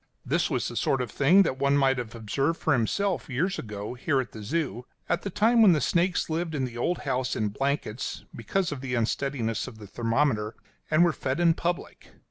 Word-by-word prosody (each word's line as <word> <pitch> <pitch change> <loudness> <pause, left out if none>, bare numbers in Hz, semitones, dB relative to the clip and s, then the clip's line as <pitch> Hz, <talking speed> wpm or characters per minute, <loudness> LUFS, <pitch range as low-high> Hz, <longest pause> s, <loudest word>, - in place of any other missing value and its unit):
This - - +1
was - - -1
the - - -6
sort 135 - +1
of 125 -4 -3
thing 170 - +5
that 130 -7 -2
one 140 +1 +3
might 135 -2 +3
have 120 -2 -6
observed 135 +9 -1
for 160 - +2
himself 170 - 0
years 180 +9 -1
ago, 105 0 -6
here 135 +2 0
at 130 - -3
the 110 - -9
Zoo; 130 +1 -2 0.2
at 175 - 0
the 200 - -4
time 225 +5 +3
when 200 -5 +8
the 155 - +2
snakes 175 +6 +1
lived 160 0 -2
in 135 -3 0
the 120 -2 -7
old 170 +9 0
house 130 -2 -1
in 105 -1 0
blankets, 135 0 -3
because 170 - -1
of 140 -3 -5
the 130 -2 -2
unsteadiness 115 0 -1
of 110 - -10
the 105 - -10
thermometer, 115 +1 0 0.3
and 155 +2 +5
were 170 - +2
fed 130 +3 -2
in 170 -1 +5
public. 175 +1 -4
135 Hz, 215 wpm, -27 LUFS, 115-165 Hz, 0.3 s, when